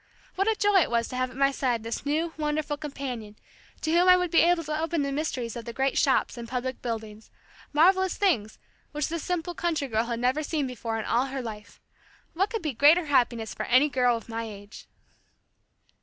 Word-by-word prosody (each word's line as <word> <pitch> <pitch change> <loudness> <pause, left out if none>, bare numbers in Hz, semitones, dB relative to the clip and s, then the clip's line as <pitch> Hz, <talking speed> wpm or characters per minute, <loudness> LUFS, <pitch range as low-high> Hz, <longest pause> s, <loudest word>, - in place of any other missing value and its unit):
What 390 +2 0
a 445 - +3
joy 410 -1 +3
it - - 0
was 235 -1 0
to 255 - -6
have 255 0 0
at 255 - -13
my 275 0 +3
side 245 -4 -1
this 230 +5 -5
new, 320 +3 0
wonderful 300 -1 -1
companion 270 -7 -6 0.5
to 315 - -1
whom 350 +2 +4
I 365 - +8
would 360 -2 -1
be 335 - +5
able 340 0 +3
to 305 +1 -3
open 325 -2 0
the 280 - -2
mysteries 270 -6 -3
of 235 - -6
the 235 - -6
great 270 +2 0
shops 265 -3 +2
and 235 - -7
public 255 +1 -4
buildings 220 -2 -6 0.4
marvelous 375 +5 +3
things 235 - +1 0.4
which 300 -1 -1
this 335 0 -3
simple 350 0 -2
country 325 -5 -1
girl 225 -1 0
had 235 -1 -3
never 255 +5 +1
seen 300 -1 -1
before 235 -3 -4
in 220 - -4
all 245 +3 +1
her 265 -1 -4
life. 210 -2 -9 0.5
What 390 +5 +1
could 450 -5 -4
be 305 -4 -2
greater 305 +8 +5
happiness 235 -7 +1
for - - -5
any 260 +5 +4
girl 250 -3 +2
of 230 - -11
my 230 0 -4
age! 205 -1 -11
275 Hz, 215 wpm, -27 LUFS, 235-320 Hz, 0.5 s, I